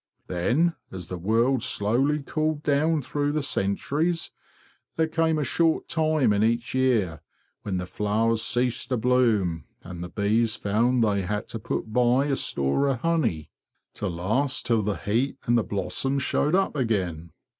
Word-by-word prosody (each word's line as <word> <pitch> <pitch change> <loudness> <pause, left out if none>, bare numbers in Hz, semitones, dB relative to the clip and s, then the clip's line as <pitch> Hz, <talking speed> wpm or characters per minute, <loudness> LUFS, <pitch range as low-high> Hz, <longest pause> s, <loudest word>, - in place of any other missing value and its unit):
Then, 125 - +1 0.2
as 90 -3 -8
the 90 - -4
world 115 +7 +2
slowly 135 +11 0
cooled 155 0 -1
down 150 +1 +2
through 145 +2 -1
the 155 -1 -1
centuries, 145 - -1 0.3
| - - -35
there 160 - +2
came 160 0 +1
a 150 - 0
short 160 +4 +1
time 155 -7 +2
in 100 +1 +2
each 115 +2 0
year 115 -11 +1 0.4
when 95 -3 -3
the 90 - -3
flowers 110 +4 0
ceased 120 +1 -1
to 125 - +1
bloom, 110 - +1 0.2
and 90 -1 -7
the 90 - -6
bees 110 +3 +1
found 115 +4 +1
they 100 -2 +1
had 105 +3 -3
to 115 - -5
put 110 +1 -4
by 125 +3 +3
a 140 -2 +1
store 70 - 0
of 130 -4 -1
honey, 155 - 0 0.4
to 105 - -4
last 105 +11 -1
till 115 -2 +2
the 105 -1 -1
heat 120 +7 -1
and 120 - +3
the 115 - +3
blossoms 105 +9 -1
showed 150 +6 +1
up 195 -4 +1
again. 90 - -1
120 Hz, 165 wpm, -25 LUFS, 100-140 Hz, 0.4 s, by